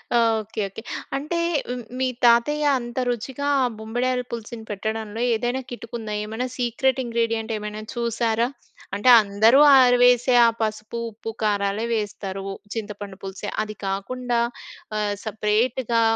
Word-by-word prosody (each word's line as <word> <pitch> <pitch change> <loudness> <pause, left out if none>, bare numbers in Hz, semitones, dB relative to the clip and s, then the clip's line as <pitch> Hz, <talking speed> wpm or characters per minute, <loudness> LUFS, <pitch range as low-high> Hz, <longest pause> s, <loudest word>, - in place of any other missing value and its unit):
Okay. 225 -2 +1
Okay. 225 - -8 0.4
అంటే 310 +5 -2 0.6
మీ 260 - +2 0.2
తాతయ్య 295 +6 +4
అంత 240 +1 -5
రుచిగా 265 +4 -3 0.2
ఆ - - +3
బొంబిడాయల 250 +3 -1
పులుసుని 230 -1 -6
పెట్టడంలో 220 +2 -4
ఏదైనా 245 +3 -1
కిటుకుందా? 230 -2 -6
ఏమైనా 225 +4 -3
సీక్రెట్ 255 +2 +1
ఇంగ్రీడియంటేమైనా 225 -2 -2
చూసారా? 235 0 0 0.5
అంటే 210 +5 +3
అందరూ 220 +6 +4 0.2
ఆరివేసే 245 0 +5
ఆ - - +5
పసుపు, 215 +1 -3
ఉప్పు, 225 +1 -7
కారాలే 205 +1 0
వేస్తారు. 195 -2 -4 0.3
చింతపండు 205 -3 -6
పులుసే 195 +2 -5
అది 215 0 -7
కాకుండా 240 +5 -2 0.6
ఆహ్, 205 -1 0
సెపరేట్‌గా 230 +3 +1
225 Hz, 115 wpm, -23 LUFS, 210-245 Hz, 0.6 s, ఆరివేసే